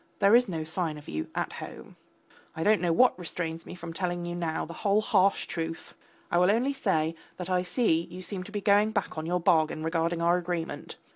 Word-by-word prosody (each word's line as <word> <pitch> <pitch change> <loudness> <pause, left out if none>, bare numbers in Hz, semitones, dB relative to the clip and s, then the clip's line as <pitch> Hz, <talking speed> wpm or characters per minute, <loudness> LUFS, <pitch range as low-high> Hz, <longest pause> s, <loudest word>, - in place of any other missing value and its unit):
There 200 +2 +4
is 245 -3 +4
no 160 -3 -2
sign 160 -1 -2
of 150 - -12
you 80 0 -3
at - - -2
home. - - -9 0.6
I 160 - -2
don't 215 +2 +4
know 175 -2 +2
what 245 +3 +4
restrains 165 -1 -4
me - - -7
from 170 -2 -7
telling 175 -1 -2
you 175 - -4
now 170 -2 -2
the 170 - -8
whole 205 +1 +3
harsh 195 -2 +3
truth. 165 -1 -5 0.4
I 175 - +3
will 180 +1 +5
only 245 +7 +2
say 165 - 0 0.2
that 180 0 -5
I 180 -1 +3
see 180 -4 +1
you 180 +2 -8
seem 185 -1 -5
to 210 - -11
be 205 -1 -3
going 210 +1 +4
back 200 -3 -1
on 155 0 -4
your 180 +1 +1
bargain 155 -2 +2
regarding 165 +1 0
our 170 +1 +3
agreement. 175 -1 -4
175 Hz, 220 wpm, -28 LUFS, 165-195 Hz, 0.6 s, will